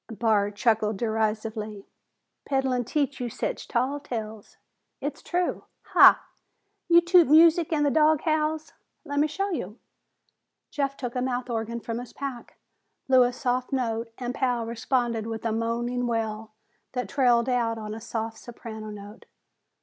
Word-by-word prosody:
Barr 220 -3 +1
chuckled 215 0 +1
derisively. 220 -1 -2 0.6
"Peddlin' 265 -3 0
teach 280 +1 -1
you 245 -1 -3
sech - - -3
tall 260 +4 0
tales?" 220 -6 -7 0.4
"It's 290 +1 -5
true." 355 0 -2 0.2
"Ha! - - +7 0.7
You 340 0 +7
toot 345 -1 +5
music 325 +3 +6
an' 300 -2 +2
the 285 - +2
dog 310 0 +4
howls?" 310 -1 -1 0.3
"Let 285 -1 -2
me 300 - +3
show 390 +6 -2
you." 210 - -4 0.9
Jeff 275 -1 -2
took 245 -2 -5
a 250 - 0
mouth 250 -1 -2
organ 230 +1 -3
from 230 +1 -4
his 245 - -9
pack, 270 -4 -7 0.5
blew 260 -1 +6
a 245 0 +4
soft 250 +1 -2
note 230 -3 -1
and 245 -1 -4
Pal 245 -3 0
responded 235 -1 -1
with 225 0 -5
a 225 - +1
moaning 240 +2 -1
wail 220 -2 -3 0.4
that 250 -4 -2
trailed 245 -1 +3
out 235 -3 0
on 215 -1 -6
a 225 - -7
soft 225 0 -4
soprano 220 -2 -9
note. 205 +1 -11
240 Hz, 150 wpm, -26 LUFS, 225-275 Hz, 0.9 s, Ha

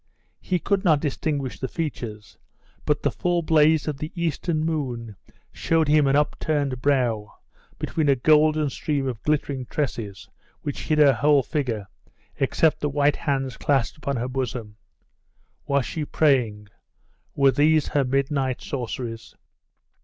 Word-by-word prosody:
He 185 - -1
could 195 +3 0
not 160 -6 +4
distinguish 145 -2 -2
the 130 - -2
features; 120 -9 -6 0.5
but 150 0 0
the - - +2
full 175 -1 0
blaze 155 -1 +4
of 150 -3 -2
the 155 - -5
eastern 165 -1 -1
moon 125 -9 -3 0.4
showed 165 -2 +1
him 150 -1 +4
an 135 - +3
upturned 145 -3 0
brow, 120 -7 0 0.4
between 155 -3 -1
a 140 - +5
golden 155 +2 +3
stream 140 0 -2
of 120 -4 -4
glittering 140 -4 -1
tresses 105 -9 -4 0.3
which 145 - -5
hid 155 - +1
her 145 -2 +6
whole 145 +2 +3
figure, 120 - -2 0.5
except 150 +3 +2
the 150 - -1
white 145 +1 +2
hands 135 -3 -2
clasped 135 -5 +1
upon 140 -2 -2
her 120 +1 -2
bosom.... 125 -5 -4 0.9
Was 140 -2 +1
she 155 +7 -4
praying? 120 -10 +1 0.7
were 140 -1 +5
these 150 +2 +3
her 145 - +2
midnight 135 0 0
sorceries?.... 115 -3 -5
140 Hz, 140 wpm, -24 LUFS, 125-155 Hz, 0.9 s, her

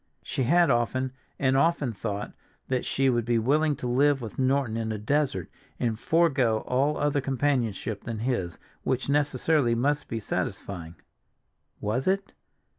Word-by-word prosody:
She 130 - -2
had 170 +2 +4
often 130 +2 0 0.3
and 135 -1 +2
often 140 -4 +2
thought 105 0 -4 0.4
that 130 -1 0
she 135 0 +1
would 120 -2 +2
be 120 +1 +1
willing 145 +6 +2
to 125 - -5
live 140 +3 +3
with 115 -1 -7
Norton 130 -3 +1
in 115 -1 -2
a 110 - -2
desert, 120 - 0 0.3
and 115 -3 -1
forego 135 -10 +2
all 140 +4 +1
other 145 -1 +1
companionship 125 -6 -1
than 115 -2 -4
his, 105 -7 -2 0.2
which 130 +1 -1
necessarily 145 -2 +2
must 145 +5 0
be 115 - -3
satisfying. 90 -5 -4 0.8
Was 115 - -1
it? 195 +1 +1
130 Hz, 150 wpm, -27 LUFS, 115-145 Hz, 0.8 s, had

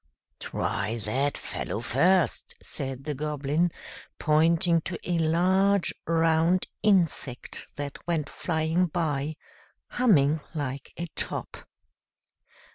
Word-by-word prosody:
"Try 110 +3 -2
that 135 +6 0
fellow - - -4
first," 165 +10 +2
said 135 -2 -4
the 150 - -3
Goblin, 150 +3 0 0.5
pointing 165 +2 +3
to 170 +1 -5
a 175 -1 0
large, 185 +4 +3
round 165 +2 +3 0.2
insect 170 - +1
that 145 -1 -5
went 160 -4 0
flying 160 +3 0
by, 155 -3 -1 0.5
humming 160 - +3 0.2
like 140 -2 -4
a 170 - -3
top. - - -2
160 Hz, 100 wpm, -27 LUFS, 145-175 Hz, 0.5 s, pointing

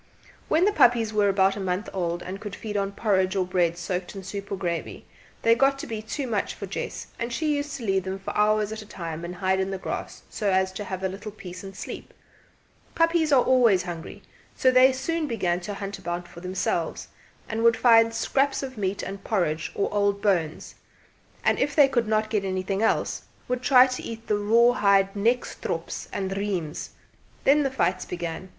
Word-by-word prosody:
When 330 +4 +3
the 415 - +4
puppies 235 - +4
were 205 -1 +3
about 195 0 +3
a - - -5
month 190 +2 -2
old, 175 -2 -2
and 190 +2 -6
could 205 -2 -6
feed 210 -2 -6
on 200 -1 -1
porridge 190 -3 +1
or 190 -2 +1
bread 175 -2 +1
soaked 180 +2 -4
in 195 - -7
soup 200 +1 -7
or - - 0
gravy, 175 -3 -4 0.4
they 230 - +6
got 275 +3 +3
to - - -6
be 220 -2 -5
too 245 +6 -4
much 220 -5 -2
for - - -6
Jess, - - -5
and 235 +1 -3
she 300 +4 0
used 285 0 -3
to 240 - -7
leave 195 -2 +1
them 190 +1 -4
for 195 - -6
hours 210 0 +2
at 220 0 -5
a - - -11
time 165 -4 -6
and 175 +1 -5
hide 190 +1 +1
in 190 0 0
the 195 - -3
grass - - -6
so 210 -3 -2
as 190 0 +2
to 205 +2 -6
have 190 -1 -5
a - - +2
little 200 +3 -7
peace 185 -3 -9
and 195 0 -9
sleep. - - -8 0.8
Puppies 330 -2 +2
are 260 -3 +6
always 235 -8 +4
hungry, 175 +3 -7 0.3
so 260 - +4
they 255 +1 +6
soon 315 +4 -2
began 180 -8 0
to 200 +3 -6
hunt 195 0 -6
about 175 -1 -4
for 170 - -12
themselves, 180 -2 -2 0.4
and 220 +1 -2
would 230 0 +5
find 230 -2 +6
scraps 270 +5 0
of 260 -4 -6
meat 195 0 -1
and 195 0 -6
porridge 170 -8 -1
or 200 - +1
old 200 -1 +1
bones; 175 -7 0 0.7
and - - +2
if 280 0 0
they 290 -3 +7
could 240 -4 0
not 215 0 +1
get 210 -3 +1
anything 190 +1 -2
else, 225 - +1 0.3
would 250 0 -1
try 255 -1 +7
to 255 -1 -4
eat 225 0 -7
the 210 -2 0
raw 230 +4 +5
hide 195 -4 +3
nekstrops 230 +5 -2
and 195 -1 -3
reims. 190 -6 -3 0.5
Then 290 +2 +5
the 275 - +1
fights 185 -7 0
began. 175 +1 -5
200 Hz, 210 wpm, -25 LUFS, 185-235 Hz, 0.8 s, they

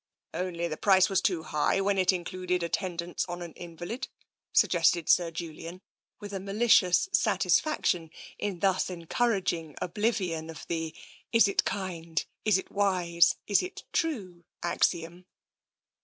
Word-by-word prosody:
'* - - -65
" - - -48
Only 170 -2 -3
the 155 -2 -5
price 190 -2 +4
was 190 0 +2
too 175 -5 0
high 155 +3 +1
when 195 0 +1
it 185 0 +4
included 180 0 -2
at 170 - -4
tendance 175 -2 -2
on 175 0 -5
an 170 -2 -9
invalid?" 175 +9 -6 0.4
suggested 170 -1 +3
Sir 175 -2 +4
Julian, 165 +1 -7 0.4
with 205 -1 -8
a 195 - -2
malicious 195 - +3
satisfaction 180 - +2 0.3
in 195 -4 -3
thus 190 -2 +2
encouraging 175 - -1
oblivion 180 -5 -1
of 160 - -9
the, 160 -1 -3 0.2
" - - -27
Is 230 -2 +6
it 200 - +1
kind, 170 -4 -3 0.2
is 210 -3 +4
it 190 - -7
wise, 180 -4 +3
is 205 - +3
it 365 - -7
true? 195 - -2
" - - -17
axiom. 175 +1 -1
180 Hz, 155 wpm, -28 LUFS, 170-195 Hz, 0.4 s, Is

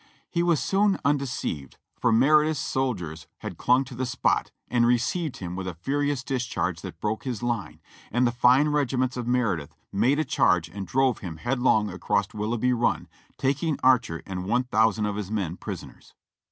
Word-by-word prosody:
He 170 - +1
was 170 -4 +3
soon 200 0 +2
undeceived, 130 - -1 0.2
for - - +1
Meredith's 150 +5 +4
soldiers 90 - -2
had - - -7
clung 125 +2 +4
to 130 - -10
the 130 +1 -2
spot, 125 - +1 0.2
and 120 -1 +2
received 125 +6 0
him 90 -1 -5
with 95 0 -4
a 90 - -4
furious 140 - -1
discharge 130 -3 -2
that - - -8
broke 105 +2 -2
his 120 -4 -4
line, 120 -4 -2 0.3
and 120 +3 +2
the 120 - +2
fine 125 +4 +4
regiments 130 -3 0
of 125 -2 -4
Meredith 110 - 0 0.2
made 120 +8 +2
a 155 - +1
charge 90 -2 +2
and 95 +2 -6
drove 130 +4 +2
him 85 -5 -7
headlong 120 -1 +2
across 100 +2 0
Willoughb) 110 +2 -2
Run, 120 0 0 0.3
taking 145 +3 0
Archer 125 -11 +3
and 90 -1 -5
one 125 +5 +1
thou 110 +1 +5
sand 110 0 -2
of 105 -1 -2
his 105 -3 -4
men 95 -6 -2
prisoners. - - -9
120 Hz, 180 wpm, -26 LUFS, 100-135 Hz, 0.3 s, thou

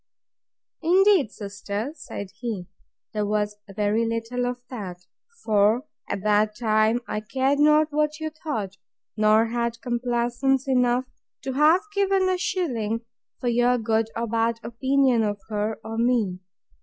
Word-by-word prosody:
Indeed, 370 - +4
sister, 205 +4 -5
said 200 - -8
he, 215 -7 -4 0.5
there 210 -1 0
was 210 0 -1
very 210 +3 +1
little 230 +2 -2
of 245 0 -4
that; 180 -7 -7 0.4
for, 215 +4 +3 0.2
at 195 - -3
that 210 0 +2
time, 220 0 +2
I 210 - -2
cared 265 +6 0
not 300 +1 +5
what 300 +1 0
you 315 0 -3
thought, 225 - -4 0.4
nor 215 +1 +4
had 235 0 -2
complaisance 245 +2 0
enough 250 -1 +2 0.4
to 265 - -2
have 305 +6 +5
given 390 -1 +2
a 370 -1 0
shilling 235 - -1 0.4
for 245 - -3
your 245 +1 +3
good 225 -1 0
or 230 - -1
bad 230 0 0
opinion 260 +1 +2
of 205 -1 -1
her 210 +1 -2
or 225 +1 -4
me. 230 -7 +1
235 Hz, 140 wpm, -25 LUFS, 215-270 Hz, 0.5 s, not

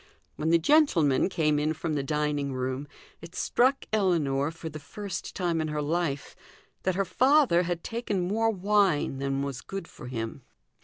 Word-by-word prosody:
When 155 - -1
the 170 - +6
gentleman 170 - +3
came 155 -5 +1
in 155 +1 +1
from 160 0 -3
the 145 - 0
dining 145 -1 -1
room, 130 +2 -3 0.3
it 170 +2 -11
struck 260 +3 +2
Ellinor, 155 -9 +2
for 165 0 -8
the 155 -1 -6
first 190 +5 -6
time 170 -3 0
in 155 - -1
her 150 0 -2
life, 150 -2 -2 0.5
that 185 -1 0
her 195 +1 +1
father 260 - +4
had 175 -1 -3
taken 210 -6 -2
more 225 +4 +2
wine 195 -8 +2
than 135 0 -1
was 140 -4 -4
good 195 -3 -6
for 120 - -11
him. 115 +1 -5
165 Hz, 170 wpm, -28 LUFS, 145-195 Hz, 0.5 s, the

